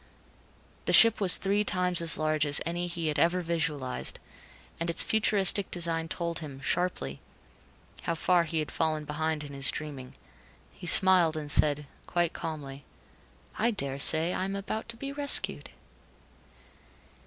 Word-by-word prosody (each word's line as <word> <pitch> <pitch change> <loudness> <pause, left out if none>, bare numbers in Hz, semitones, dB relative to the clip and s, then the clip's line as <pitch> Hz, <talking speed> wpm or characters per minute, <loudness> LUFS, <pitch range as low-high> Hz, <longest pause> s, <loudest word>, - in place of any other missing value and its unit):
The - - -1
ship 230 -2 +6
was 190 -2 +7
three 200 +2 0
times 180 -3 +1
as 165 -1 +2
large 155 -1 -1
as 145 -1 +3
any 175 +1 -3
he 170 -1 -5
had 150 -1 -2
ever 175 +4 +1
visualized, 155 -6 -2 0.6
and 165 +1 -3
its 165 - +3
futuristic 200 -3 +1
design 165 -2 -1
told 170 0 -4
him, 145 -4 -9
sharply, 135 - -3 0.8
how 170 - -3
far 175 +1 +1
he 160 +1 -4
had 155 -1 -3
fallen 155 -2 -2
behind 155 +1 -3
in 145 -1 -10
his 135 -1 +2
dreaming. 140 -4 -7 0.6
He 175 - -10
smiled 175 -3 +6
and 150 -2 -5
said, 150 0 +1 0.2
quite 175 -1 -1
calmly, 145 -4 -7 0.8
"I 230 - +2
daresay 160 - +2
I - - -3
am 195 +1 -4
about 215 +3 -6
to 230 - -2
be 275 +3 -6
rescued." 285 0 +1
165 Hz, 150 wpm, -27 LUFS, 150-180 Hz, 0.8 s, was